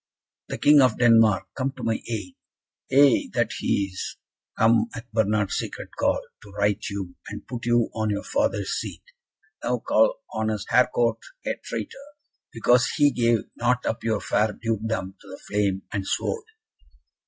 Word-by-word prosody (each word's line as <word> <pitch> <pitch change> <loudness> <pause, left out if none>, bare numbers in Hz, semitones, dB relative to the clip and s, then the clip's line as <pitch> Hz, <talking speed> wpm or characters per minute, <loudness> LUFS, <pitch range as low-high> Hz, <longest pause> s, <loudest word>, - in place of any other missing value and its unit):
"The - - -4
King 145 0 +6
of 125 -4 +3
Denmark! 110 -6 +4
Come 135 0 -2
to 130 - -10
my 115 -1 0
aid!" 105 -6 -4 0.6
"Ay, 140 -1 +5
that - - +1
he 100 - +1
is! 95 - -6 0.4
Come 115 0 +4
at 115 0 -9
Bernard's 105 -2 +1
secret - - -5
call, - - +1 0.2
to 105 - -14
right 105 0 0
you, 100 -3 -5 0.2
and 105 - -8
put 120 -2 -6
you 120 -1 +2
on 110 -1 -1
your 105 - -2
father's 280 +1 0
seat. - - -7 0.6
Now - - +1
call - - +2
honest 110 -2 -2
Harcourt 125 -2 +3 0.3
a - - 0
traitor, 280 +2 -7 0.4
because 120 +1 +3
he 145 -1 +4
gave 115 -3 +2
not 125 +1 0
up 110 - -2
your 110 -2 0
fair 105 0 +1
dukedom 110 -4 -3
to - - -17
the 95 - -9
flame 100 -2 -1
and 100 - -1
sword!" 450 -2 -2
115 Hz, 160 wpm, -25 LUFS, 105-125 Hz, 0.6 s, King